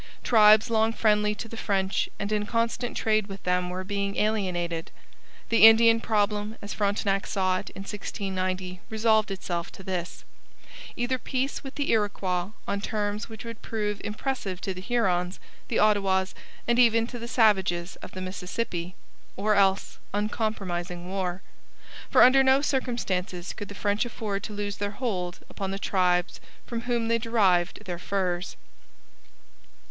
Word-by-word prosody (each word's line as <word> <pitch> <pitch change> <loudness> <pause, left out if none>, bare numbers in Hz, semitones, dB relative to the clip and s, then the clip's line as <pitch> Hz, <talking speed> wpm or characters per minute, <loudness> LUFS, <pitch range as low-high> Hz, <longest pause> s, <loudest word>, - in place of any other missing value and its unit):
Tribes 215 0 +6
long 220 0 +3
friendly 210 -2 +2
to 225 - -6
the 230 - -9
French 195 -3 0
and 200 - -3
in 210 -1 0
constant 230 +1 -1
trade 215 -2 +1
with 195 -1 -9
them 180 0 +1
were 185 +1 -4
being 200 0 -2
alienated. 180 -6 -1 0.6
The 230 -1 +9
Indian 225 0 +6
problem 210 0 0
as 205 - -6
Frontenac 200 -1 0
saw 185 -1 +1
it - - -8
in - - -6
1690 185 -3 -4
resolved 220 -1 +2
itself 175 -3 -4
to 190 - -11
this: 180 -2 -4 0.7
either 250 +2 -1
peace 260 +3 -2
with 270 -1 -8
the 285 - 0
Iroquois 195 -4 0 0.2
on 200 - -1
terms 210 0 -2
which 220 +1 -9
would 230 -1 -8
prove 210 -2 -3
impressive 210 -4 -3
to 190 - -2
the 185 - -8
Hurons, 185 -5 0 0.3
the - - -1
Ottawas, 195 -3 +2 0.3
and 235 +1 +3
even 230 -2 +5
to 245 +1 -7
the 235 - -6
savages 195 -7 +2
of - - -11
the 185 - -6
Mississippi; 185 -1 -4 0.4
or 210 +2 +1
else 195 -1 +2 0.2
uncompromising 190 -5 -2
war. 185 -1 -3 0.7
For - - +7
under 265 +2 +7
no 265 +1 +4
circumstances 195 -10 -2
could 205 - -7
the 200 - -9
French 205 +1 0
afford 215 -4 -3
to 215 - -6
lose 205 -1 -3
their 205 0 -4
hold 180 -8 -3
upon 195 -1 -5
the 195 - -3
tribes 180 -3 +1 0.2
from 235 -1 -4
whom 235 -2 +1
they 230 0 +2
derived 195 -7 +2
their 175 -2 -4
furs. 180 -1 -2
205 Hz, 155 wpm, -27 LUFS, 185-225 Hz, 0.7 s, The